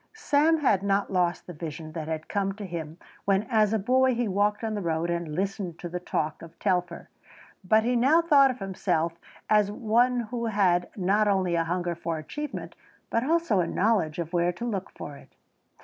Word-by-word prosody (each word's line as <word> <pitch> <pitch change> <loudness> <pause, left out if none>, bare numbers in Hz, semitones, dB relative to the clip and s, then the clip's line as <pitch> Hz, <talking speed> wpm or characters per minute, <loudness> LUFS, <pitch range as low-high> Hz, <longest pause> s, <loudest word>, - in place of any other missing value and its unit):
Sam 320 -6 +2
had 205 -9 +3
not 200 0 0
lost 175 -2 +1
the 180 - -8
vision 155 0 -7
that 155 -1 -5
had 160 0 -4
come 195 -1 -1
to 205 0 -7
him 165 -3 -6 0.3
when 195 0 +2
as 215 -2 +3
a 220 - +2
boy 255 +4 +3
he 240 -1 0
walked 205 +2 +1
on 220 -1 -1
the 205 - -2
road 170 0 -1
and 170 -3 -3
listened 190 -2 -3
to 175 - -6
the 180 +1 -4
talk 155 -3 -2
of 165 0 -12
Telfer, 180 -3 -1 0.6
but 220 +4 +4
he 245 +2 +1
now 270 +7 +5
thought 290 -5 +5
of 255 - -3
himself 180 -4 -1 0.3
as 210 -2 +4
one 240 +3 +2
who 235 -2 -2
had 185 -5 +2
not 200 +3 +2
only 190 -3 +1
a 165 -1 +1
hunger 175 +1 -1
for 170 -1 -4
achievement 295 - -6 0.4
but 230 - +1
also 325 - +2
a 170 - +1
knowledge 190 -7 +1
of 170 0 -4
where 175 0 +2
to 180 +7 -6
look 200 -5 -3
for 145 -1 -9
it. - - -19
195 Hz, 200 wpm, -27 LUFS, 170-225 Hz, 0.6 s, now